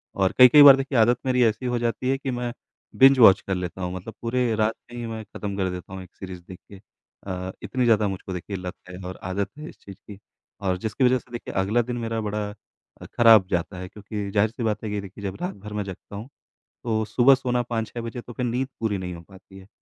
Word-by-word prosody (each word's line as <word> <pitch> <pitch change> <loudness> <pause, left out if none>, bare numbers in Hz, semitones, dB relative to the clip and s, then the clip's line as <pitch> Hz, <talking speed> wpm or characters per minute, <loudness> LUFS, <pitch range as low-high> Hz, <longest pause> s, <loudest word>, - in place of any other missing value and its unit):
और 95 -1 +2
कई-कई 125 +3 +9
बार 140 -2 +11
देखिए 135 -1 -2
आदत 120 +2 +4
मेरी 125 -1 +3
ऐसी 110 +3 0
हो 125 -1 0
जाती 120 +2 -1
है 135 - +2
कि 135 -1 -4
मैं 120 -1 -3 0.4
बिंज 135 0 +6
वॉच 105 -5 +8
कर 95 - -3
लेता 90 +1 -5
हूँ 90 0 -3
मतलब 95 +5 -8
पूरे 120 -1 0
रात 110 +1 +1 0.2
में 120 - -8
ही 120 - -4
मैं 110 -1 -6
खत्म 100 0 -6
कर 95 -2 0
देता 90 +1 -8
हूँ 95 - -6
एक 90 - -18
सीरीज 95 -2 -8
देख 90 - -10
के 100 - -11 0.5
अ, 95 0 -4
इतनी 130 -1 -1
ज़्यादा 110 -3 +3
मुझको 95 -1 -5
देखिए 90 +3 -5
लत 90 -1 -6
है 90 - -8
और 95 +1 -7
आदत 95 +2 -2
है 155 - -7
इस - - -15
चीज 100 -1 -12
की। 100 -2 -10 0.4
और 95 -2 0
जिसकी 110 +6 -2
वजह 130 0 +4
से - - -24
देखिए 120 - -7
अगला 105 +5 +1
दिन 120 +1 -4
मेरा 115 -1 -3
बड़ा 105 -1 -3 0.5
अ, - - -8
ख़राब 115 -5 +5
जाता 90 +1 -2
है 90 - -6
क्योंकि 105 0 -6
जाहिर-सी 110 +4 0
बात 110 -1 -1
है 110 - -4
ये 105 -1 -2
देखिए 100 +1 -11
जब 95 -1 -4
रात 180 - -3
भर 105 +1 -10
मैं 105 0 -2
जगता 95 +1 -10
हूँ, 110 +6 -8 0.5
तो 110 -2 0
सुबह 125 +5 +5
सोना 125 -2 -1
5-6 115 0 -3
बजे 115 +1 -6
तो 120 - -11
फिर 125 - -3
नींद 125 +2 -1
पूरी 110 -3 -1
नहीं 90 -1 -5
हो 85 - -10
पाती 95 0 -15
है। 95 - -16
110 Hz, 250 wpm, -24 LUFS, 95-120 Hz, 0.5 s, बार